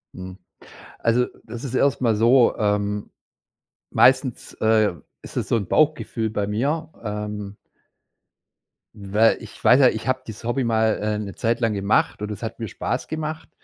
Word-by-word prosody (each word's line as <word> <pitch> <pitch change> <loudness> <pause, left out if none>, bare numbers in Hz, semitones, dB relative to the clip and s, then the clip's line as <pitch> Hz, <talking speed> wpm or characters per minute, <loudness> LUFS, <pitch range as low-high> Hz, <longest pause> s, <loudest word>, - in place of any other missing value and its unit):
Mhm. 95 0 -8 0.6
Also, 120 +2 +2 0.2
das 115 +1 -8
ist 130 -3 -5
erstmal 125 -5 +2
so, 120 +3 +4
ähm 105 -1 -1 0.8
meistens, - - +2
äh, 110 -3 +2 0.3
ist - - -11
es - - -1
so - - +1
'n 100 -5 -3
Bauchgefühl 135 -7 +1
bei 105 -2 -2
mir, 150 +9 -1
ähm 105 -1 -5 1.4
weil 105 +3 +2
ich 105 - -12
weiß 130 +3 +6
ja, 130 - +7
ich - - -5
habe 130 0 0
dieses 110 -1 -9
Hobby 120 +3 0
mal, 110 -2 +2
äh, 105 0 -1
'ne 100 -2 -6
Zeit 115 +1 0
lang 115 -3 +1
gemacht 100 +1 +1
und 105 0 -4
es 105 - -7
hat 115 0 -6
mir 115 - -4
Spaß - - -3
gemacht. 155 0 -5
110 Hz, 165 wpm, -23 LUFS, 105-125 Hz, 1.4 s, ja